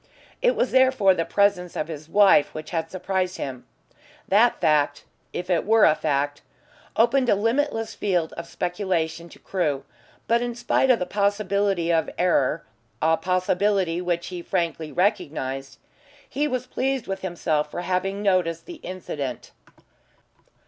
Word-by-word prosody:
It - - +3
was 255 - 0
therefore 260 -7 +4
the 165 -2 -1
presence 200 -4 +1
of 155 - -2
his 155 -1 -8
wife 200 -6 +5
which 155 0 -7
had 165 -2 -2
surprised 185 0 -2
him. 130 -3 -6 0.6
That 225 +5 +4
fact 150 -3 +2 0.3
if 180 - -5
it 175 -3 +1
were 220 +1 +5
a 155 - +6
fact 145 -2 -1 0.5
opened 250 +2 +3
a - - +5
limitless 225 +1 0
field 175 -6 -1
of 170 0 -7
speculation 175 -3 -2
to - - -15
Crewe, 150 -8 -2 0.4
but 235 +1 +3
in 240 -1 -3
spite 245 +2 +1
of 250 - +6
the 180 - -2
possibility 200 -3 0
of 160 -2 +1
error 165 -4 +1 0.3
a 160 +1 +3
possibility 185 0 0
which 175 -1 -2
he 180 -1 -6
frankly 165 -4 -2
recognised 135 - -1 0.5
he 290 +3 -1
was 255 -3 -2
pleased 265 0 -2
with 195 - -4
himself 160 -5 -1
for 175 - -5
having 195 +3 -2
noticed 180 -4 +1
the 350 -2 -9
incident. 145 -9 -6
180 Hz, 150 wpm, -24 LUFS, 160-205 Hz, 0.6 s, a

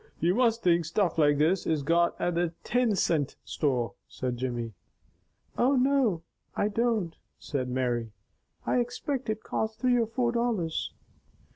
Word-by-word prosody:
"You 170 +3 +3
must 230 0 +2
think 175 -1 +4
stuff 170 0 0
like 145 -1 +4
this 165 +5 +2
is 155 -3 +1
got 170 +3 +2
at 175 - 0
the 170 -1 0
tin 245 -4 +2
cint 155 -6 +1
store," 125 -6 0
said 125 -1 -3
Jimmy. 120 -2 -3 0.9
"Oh, 265 +3 +4
no 255 -9 +2 0.3
I 205 - +1
don't!" 220 -6 0 0.2
said 130 -4 -3
Mary. 120 -3 -1 0.5
"I - - +2
expect 245 +1 -2
it 215 0 -2
cost 220 0 -2
three 250 -1 +3
or 230 -2 +2
four 235 +1 0
dollars." 230 -9 -1
175 Hz, 150 wpm, -28 LUFS, 145-235 Hz, 0.9 s, think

